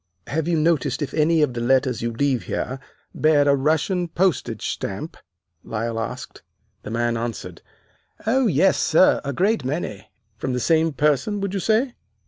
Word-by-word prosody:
"'Have 160 +2 -2
you 170 -1 +1
noticed 150 -4 +1
if 145 - -5
any 160 0 +3
of 135 -4 0
the 120 - -4
letters 130 0 +2
you 115 0 -1
leave 130 0 0
here 130 +1 -3 0.3
bear 150 -2 +3
a 140 - +5
Russian 160 +6 0
postage 175 -1 -1
stamp!' - - -4 0.5
Lyle 115 +1 -3
asked. 115 - -6 0.4
"The - - -8
man 120 +1 0
answered, 115 -1 -5 0.6
'Oh, 250 +3 +2
yes, 185 +2 +3
sir, 165 +3 +4
a 140 - -3
great 190 - +1
many.' 130 - -4 0.3
"'From 130 +3 -3
the 125 - -1
same 160 +4 +2
person, 150 - +1
would 200 -1 -2
you 195 - -1
say! 225 +7 +1
150 Hz, 165 wpm, -22 LUFS, 125-170 Hz, 0.6 s, a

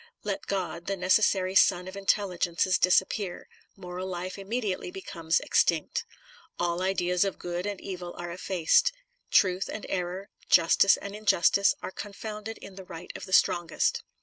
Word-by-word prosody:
Let - - -4
God, 180 -3 -3
the 195 0 -1
necessary 185 0 +2
sun 180 -2 +4
of 185 - -8
intelligences, 185 -2 +1
disappear; 190 +1 +1 0.3
moral 185 -1 -6
life 185 0 -5
immedi 205 0 -2
ately 360 - -8
becomes 170 - -1
extinct. 165 -3 +1 0.5
All 175 0 -1
ideas 180 -1 +1
of 195 -2 -2
good 175 +2 -4
and 205 -2 -4
evil 180 -2 -7
are 175 0 -5
effaced. 180 - +2 0.4
Truth 185 -1 +3
and 215 - -6
error, 185 +2 -3 0.2
justice 185 +3 +5
and 200 0 -7
injustice, 200 -1 +3
are - - -4
confounded 210 +2 -7
in 195 -1 -12
the 190 - -8
right 175 -1 -9
of - - -7
the - - -11
strongest. 175 -3 +2
185 Hz, 150 wpm, -28 LUFS, 175-200 Hz, 0.5 s, justice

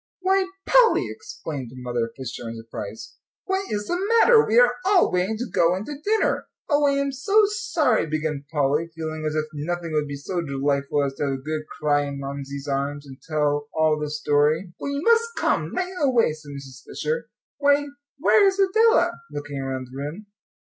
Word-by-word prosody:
"Why, 380 0 +2 0.2
Polly!" - - +5
exclaimed 140 -6 -7
Mother 120 -2 -3
Fisher, 120 -2 -6
in 115 - -6
surprise, 115 -1 -8 0.3
"what 385 0 -2
is 210 0 -2
the 350 - -1
matter? 460 -1 +7
We 225 - +1
are 245 0 +5
all 385 0 +4
waiting 185 +5 0
to 245 - -3
go 170 -4 +2
in 190 +3 -5
to 295 +2 -7
dinner." 435 +1 +1 0.2
"Oh, 290 -2 +3
I'm 280 0 +1
so 395 +11 +3
sorry," 340 - +1
began 155 -2 -2
Polly, 150 +2 +1
feeling 155 -1 -4
as 155 - -2
if 155 0 0
nothing 170 +3 -3
would 150 -1 0
be 145 - -5
so 175 +6 -3
delightful 140 -1 0
as 140 -1 -2
to - - -1
have 140 - 0
a - - -2
good 155 +1 -4
cry 145 -1 +2
in 140 0 -5
Mamsie's 140 0 -6
arms 140 +1 -2
and 135 -1 -12
tell 145 -2 0
all 155 -1 +2
the 150 0 -3
story. 150 +4 +1
"Well, 280 - -3
you 280 +2 -3
must 465 +1 +3
come - - 0
right 370 0 -2
away," 250 - +3
said 155 -1 -12
Mrs. 135 -2 -9
Fisher. 475 +1 -3 0.3
"Why, 285 0 +3 0.3
where 400 +7 +5
is 385 0 +1
Adela?" 440 +4 +4 0.2
looking 145 -1 -5
around 130 -1 -3
the - - -11
room. 150 +9 -6
155 Hz, 190 wpm, -24 LUFS, -, 0.3 s, matter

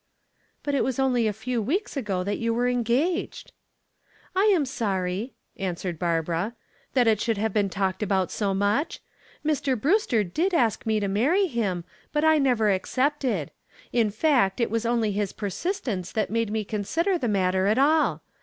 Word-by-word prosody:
"But 285 - -2
it 275 - +2
was 260 -2 -1
only 250 -4 +2
a - - +1
few 235 +3 -3
weeks 345 - -2
ago 200 -9 -1
that 205 +2 -2
you 230 0 0
were 245 +1 +1
engaged." 250 +9 0 0.8
"I 385 +2 +3
am 375 -9 +4
sorry," 200 -2 -2 0.2
answered 180 -3 -3
Barbara, 170 +5 -1 0.4
"that 250 -2 +4
it 220 -2 +3
should 225 -2 0
have 215 0 -1
been 205 -2 +2
talked 190 0 -1
about 190 -3 0
so 200 -2 -1
much. 205 - 0 0.4
Mr. 285 -5 0
Brewster 280 - +2
did 335 - 0
ask 230 -6 +1
me 220 -1 +2
to 200 - -1
marry 275 - +2
him, 215 - -2 0.3
but 300 +1 +1
I 315 -1 +5
never 240 -6 +3
accepted. 255 - 0 0.4
In 230 -3 +3
fact, 220 -3 +2
it 235 -3 0
was 230 0 0
only 230 -3 +1
his 205 -1 -2
persistence 210 - -3
that 215 -2 -1
made 230 -1 0
me 220 0 -1
consider 325 - -1
the 245 - -1
matter 190 -2 +1
at 215 +3 +2
all. 305 +4 +3
225 Hz, 175 wpm, -25 LUFS, 200-270 Hz, 0.8 s, I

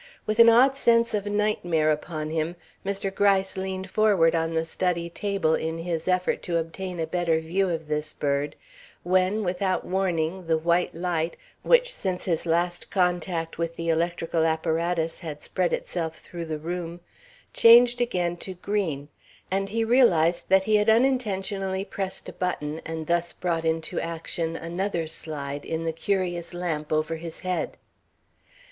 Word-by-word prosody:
With 215 +1 -2
an 230 0 +10
odd 255 +4 +6
sense 235 -2 +3
of 205 -1 -1
nightmare 190 -7 +1
upon 155 0 -3
him, 160 +2 -1 0.3
Mr. 195 0 -2
Gryce 195 -1 +2
leaned 190 0 -4
forward 195 -5 +3
on 165 0 0
the 160 0 +1
study 170 0 -1
table 195 -4 0
in 160 +1 -1
his 165 0 -3
effort 185 0 +1
to 170 -1 -1
obtain 175 +2 -4
a 165 - 0
better 165 -1 +1
view 180 +4 0
of 165 -2 -3
this 150 0 -2
bird, 145 0 -1 0.5
when, 185 +4 +2
without 185 +1 -1
warning, 180 -2 -1
the 160 -1 +3
white 170 +2 +1
light, 170 -1 -1 0.2
which - - +4
since 185 - -3
his 170 -2 -1
last 175 +1 0
contact 175 -3 -1
with 165 0 -2
the 165 0 -3
electrical 165 0 0
apparatus 165 +1 0
had 155 -4 -7
spread 180 -2 0
itself 165 -3 -3
through 170 -1 -7
the 160 -1 -3
room, 170 +2 -5 0.5
changed 240 +1 +7
again 175 -7 0
to 185 +1 -7
green, 175 -7 -2 0.4
and 195 +1 0
he 225 +2 0
realized 180 -9 +3
that 190 0 +5
he 215 +1 +3
had 210 +1 +2
unintentionally 200 -6 +1
pressed 195 -1 -4
a - - -7
button 160 -4 -3
and 160 -1 -4
thus 170 +1 0
brought 165 -2 -2
into 160 0 -1
action 165 0 -3
another 170 +1 -2
slide 145 -3 -5
in 160 0 -3
the 165 -1 -1
curious 175 -1 -2
lamp 160 -4 -3
over 155 +1 0
his 165 0 -8
head. 185 -1 -2
175 Hz, 160 wpm, -26 LUFS, 165-195 Hz, 0.5 s, an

